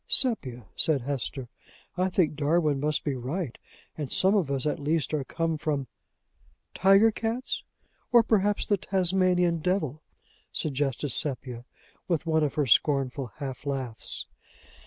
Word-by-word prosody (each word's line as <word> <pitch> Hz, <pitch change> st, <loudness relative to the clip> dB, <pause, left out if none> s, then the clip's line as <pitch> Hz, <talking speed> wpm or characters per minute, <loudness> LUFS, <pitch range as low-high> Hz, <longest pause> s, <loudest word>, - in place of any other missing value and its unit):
"Sepia!" 130 Hz, -, +2 dB
said 150 Hz, -4 st, +2 dB
Hesper, 135 Hz, 0 st, -4 dB, 0.5 s
"I 185 Hz, +1 st, +1 dB
think 175 Hz, -5 st, +1 dB
Darwin 150 Hz, -1 st, +1 dB
must 150 Hz, +1 st, 0 dB
be 145 Hz, -, -1 dB
right, 130 Hz, +3 st, -4 dB, 0.4 s
and 150 Hz, -4 st, -5 dB
some 190 Hz, +2 st, +4 dB
of 190 Hz, -9 st, +1 dB
us 135 Hz, -1 st, +1 dB
at 150 Hz, -, -1 dB
least 155 Hz, +1 st, -1 dB
are 150 Hz, -3 st, 0 dB
come 165 Hz, +2 st, -2 dB
from 145 Hz, -3 st, -1 dB, 0.5 s
" -, -, -37 dB
"Tiger 195 Hz, +4 st, +5 dB
cats? 230 Hz, +4 st, -3 dB, 0.5 s
or 240 Hz, -1 st, +7 dB
perhaps 205 Hz, -2 st, +1 dB
the 205 Hz, -, +2 dB
Tasmanian 180 Hz, -2 st, +2 dB
devil?" 155 Hz, -4 st, -1 dB, 0.5 s
suggested 140 Hz, -1 st, -1 dB
Sepia, 125 Hz, -2 st, 0 dB, 0.4 s
with 170 Hz, -2 st, 0 dB
one 160 Hz, -1 st, +2 dB
of 145 Hz, -, -1 dB
her 150 Hz, -, +1 dB
scornful 135 Hz, 0 st, +2 dB
half 135 Hz, -3 st, -6 dB
laughs. 130 Hz, -5 st, -4 dB
150 Hz, 140 wpm, -27 LUFS, 135-185 Hz, 0.5 s, or